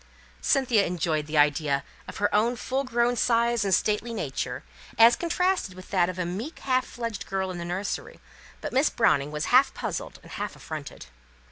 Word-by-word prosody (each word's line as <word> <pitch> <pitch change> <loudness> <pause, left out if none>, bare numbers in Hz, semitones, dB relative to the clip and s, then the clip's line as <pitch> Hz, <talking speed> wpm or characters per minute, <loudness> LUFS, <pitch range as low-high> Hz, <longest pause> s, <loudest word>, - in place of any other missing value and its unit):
Cynthia 245 -6 +3
enjoyed 160 -4 -1
the 155 0 -2
idea 145 -1 +3 0.2
of - - -8
her 205 0 0
own 225 +4 +3
full 260 +3 -2
grown 240 -1 +1
size 235 -1 +2
and 195 - -1
stately 210 +4 +1
gait, 145 -10 -2 0.5
as 230 +1 +8
contrasted 345 - 0
with 185 0 -12
that 180 -2 +3
of 185 - -5
a 180 - -1
meek, 210 - -5
half 255 -1 +1
fledged 230 -4 -5
girl 190 -1 -2
in 175 - -6
the 170 - -5
nursery; 185 +4 -4 0.4
but - - -5
Miss 270 +4 +4
Browning 145 -11 +2
was 150 0 -2
half 260 +2 +5
puzzled - - -4
and - - -14
half 205 -1 -4
affronted. 155 -3 -8
205 Hz, 180 wpm, -26 LUFS, 175-240 Hz, 0.5 s, as